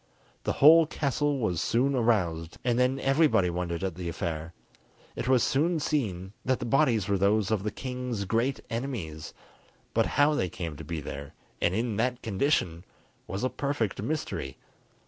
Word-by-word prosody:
The - - +1
whole 160 +2 +7
castle 145 0 0
was 90 - -1
soon 130 +5 +2
aroused, 90 -10 0
and 120 0 +2
then 130 +2 +2
everybody 135 - +3
wondered 85 0 -3
at 95 -2 -1
the 85 0 -5
affair: 80 -1 -4 0.6
it - - -4
was 130 -2 +4
soon 160 +5 +1
seen 100 - -2
that 130 0 +1
the - - -4
bodies 120 -5 +2
were 100 -2 +1
those 100 +1 +2
of 110 -3 +1
the 105 - -1
king's 125 -4 -4
great 115 +7 0
enemies, 115 - -4 0.6
but - - +2
how 145 +1 +5
they 95 -11 0
came 85 -4 -5
to 80 - -8
be 80 +1 -4
there 70 +1 -7 0.3
and 85 +2 +2
in 115 -1 -1
that 125 +2 -1
condition 95 - 0 0.4
was 95 +5 -4
a - - +3
perfect 130 -8 -2
mystery. 115 - -3
110 Hz, 165 wpm, -28 LUFS, 90-135 Hz, 0.6 s, whole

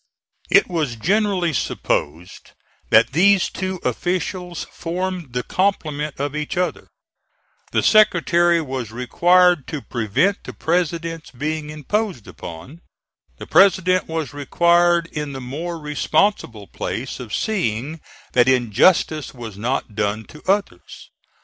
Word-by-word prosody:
It - - +5
was 155 -8 -2
generally 185 - +1
supposed 85 - -3 0.4
that - - +5
these 190 +5 +4
two 185 -1 -4
officials 180 -1 -2
formed 175 -4 -4
the 125 0 -1
complement 155 -7 -1
of 145 +1 -2
each 150 +2 -4
other. 180 0 -2 0.8
The - - +1
Secretary 175 -5 +4
was 130 -6 -5
required 175 +7 +3
to 150 - -4
prevent 120 - 0
the - - -8
President's 165 -1 -2
being 150 +3 -4
imposed 155 - -3
upon. 85 - -10 0.6
The - - -8
President 185 -1 +4
was 160 -3 -4
required 170 +4 +3
in 150 -2 -4
the 135 - -6
more 155 +7 -5
responsible 150 - 0
place 125 +7 -5
of 120 -4 -8
seeing 150 - -2 0.3
that 125 0 +4
injustice 130 - +2
was 115 -4 -8
not 115 +2 -2
done 105 +1 -2
to 150 - -13
others. 195 - -4
155 Hz, 120 wpm, -21 LUFS, 125-180 Hz, 0.8 s, It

